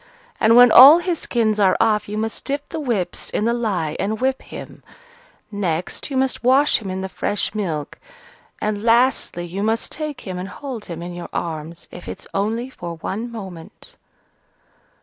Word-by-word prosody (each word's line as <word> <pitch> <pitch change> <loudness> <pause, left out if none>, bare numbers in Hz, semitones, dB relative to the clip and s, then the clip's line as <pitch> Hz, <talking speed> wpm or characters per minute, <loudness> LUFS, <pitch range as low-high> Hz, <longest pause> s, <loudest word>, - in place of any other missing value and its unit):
And 225 +1 +5
when 245 -1 +8
all 275 +6 +11
his 345 -1 -1
skins 220 -3 0
are 190 -2 +4
off, 215 -2 +2
you 210 - -4
must 220 +1 -3
dip 285 +1 -3
the 325 - -4
whips 235 - -2
in 210 - -1
the 235 - +2
lye 190 -10 -1
and 215 +2 -1
whip 265 +1 0
him; - - -10 0.7
next, 180 - -3
you 270 - -2
must 265 -1 0
wash 270 +4 +4
him 205 -4 -7
in 185 0 -3
the 190 - -3
fresh 205 +2 -2
milk; 165 -9 -4 0.6
and, 210 -1 -2
lastly, 230 -6 +2
you 180 +3 -5
must 225 +2 0
take 305 -3 -4
him 185 -2 -6
and 185 +2 -5
hold 260 -5 -7
him 170 -1 -7
in 175 0 -6
your 175 0 -7
arms, 165 0 -5
if 175 - -10
it's - - -7
only 220 +5 -1
for 170 -7 -7
one 220 +8 -5
moment." 190 -7 -10
215 Hz, 180 wpm, -21 LUFS, 180-245 Hz, 0.7 s, all